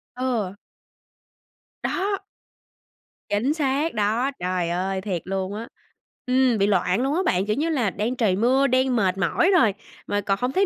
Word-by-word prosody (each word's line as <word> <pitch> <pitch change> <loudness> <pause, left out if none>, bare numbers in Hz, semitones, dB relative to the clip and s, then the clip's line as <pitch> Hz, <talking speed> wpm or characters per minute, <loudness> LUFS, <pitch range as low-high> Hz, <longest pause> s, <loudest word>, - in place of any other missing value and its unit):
Ừ. 235 -7 -2 1.3
Đó. 395 +1 -1 1.1
Chính 235 +9 +1
xác 295 +1 0
đó, 220 +6 +1
trời 180 -1 -1
ơi! 190 +2 -1
Thiệt 185 -5 -3
luôn 190 +1 -3
á. 225 +2 -6 0.6
Ừm, 255 -2 +3
bị 200 0 +2
loạn 190 +2 +2
luôn 275 +4 0
á 370 - +2
bạn. 185 - +1
Kiểu 210 - 0
như 315 +4 0
là, 250 -10 +1
đang 220 +6 -2
trời 215 -7 +2
mưa, 260 +6 +3
đang 255 0 +2
mệt 190 -3 +1
mỏi 335 - +2
rồi, 220 - +4 0.3
mà 205 0 0
còn 195 0 0
hông 250 +1 0
thấy 390 +6 +2
220 Hz, 170 wpm, -24 LUFS, 195-265 Hz, 1.3 s, rồi